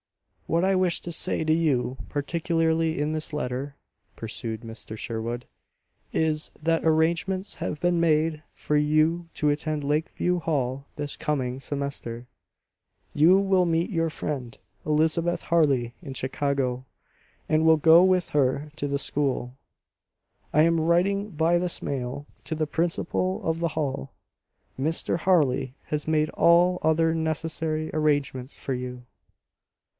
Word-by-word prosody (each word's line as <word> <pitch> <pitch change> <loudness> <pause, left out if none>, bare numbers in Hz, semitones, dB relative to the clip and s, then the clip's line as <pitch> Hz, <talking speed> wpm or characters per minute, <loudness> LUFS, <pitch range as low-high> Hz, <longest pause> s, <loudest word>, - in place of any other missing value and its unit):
"What 170 +3 +2
I 190 0 +3
wish 185 -2 +2
to 175 - -5
say 160 -1 0
to 155 - +3
you 140 -6 +1
particularly 165 +1 0
in 150 +1 0
this 155 0 -1
letter," 140 -1 -3 0.4
pursued 110 0 -5
Mr. 115 -1 -7
Sherwood, 115 +2 -4 0.7
"is, 155 -1 0
that 165 +1 +1
arrangements 170 +5 +1
have 150 - -4
been 175 0 +2
made 155 -1 +2
for 150 - -2
you 155 +3 +2
to 150 - +1
attend 150 0 -1
Lakeview 160 +4 0
Hall 140 -4 -2
this 145 -1 -2
coming 130 -4 -2
semester. 140 -5 -4 0.9
You 165 +6 +6
will 195 -2 +3
meet 165 +3 0
your 165 -3 +1
friend, 135 -6 -5 0.3
Elizabeth 160 +3 +1
Harley, 140 -8 +2
in 135 - -8
Chicago, 130 -1 -1 0.6
and 155 0 +2
will 160 0 +6
go 160 +3 +7
with 185 -1 +2
her 140 +1 +1
to 145 - -2
the 140 0 0
school. 135 -4 -2 1.0
I 150 - +5
am 165 0 +3
writing 190 +5 +2
by 165 0 +2
this 180 0 -2
mail 135 +1 -4 0.2
to 160 +4 -3
the 155 -1 -1
principal 175 +3 -1
of 160 0 0
the 170 0 0
Hall. 135 - -2 0.7
Mr. 160 +4 -1
Harley 140 -8 +2
has 150 0 -3
made 155 -1 +2
all 175 +2 +4
other 160 +1 +3
necessary 160 0 -2
arrangements 145 -4 0
for 135 - -3
you." 125 0 -6
155 Hz, 135 wpm, -26 LUFS, 140-165 Hz, 1.0 s, go